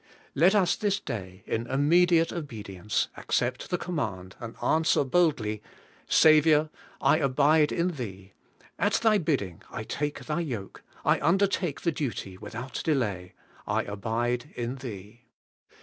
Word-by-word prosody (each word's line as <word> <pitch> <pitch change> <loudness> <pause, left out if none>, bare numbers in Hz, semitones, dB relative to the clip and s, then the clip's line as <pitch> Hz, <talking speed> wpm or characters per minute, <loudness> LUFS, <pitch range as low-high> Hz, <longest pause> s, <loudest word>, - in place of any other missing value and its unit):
Let 175 +8 +4
us 185 -4 +3
this 205 -1 0
day 95 -5 -7
in 115 +1 -2
immediate 165 +5 +3
obedience 105 - -3
accept - - -1
the 180 - 0
command, 100 - -4
and 115 -1 -7
answer 160 -1 +2
boldly, 130 -9 +1 0.5
\Saviour, 155 0 +5 0.3
I - - +4
abide 150 +1 +3
in 170 +2 +1
Thee. 100 - -7 0.5
At - - +2
Thy 220 -2 +3
bidding 130 - -1
I 110 - -5
take 145 +6 -4
Thy 155 +2 -1
yoke; 120 - -5 0.2
I - - +3
undertake 180 -1 +1
the 170 - +1
duty 125 - -4
without 120 +7 -6
delay; 105 - -1 0.3
I - - +1
abide 120 +5 -2
in 120 +2 -3
Thee.' 110 -3 -9
135 Hz, 135 wpm, -27 LUFS, 110-160 Hz, 0.5 s, Saviour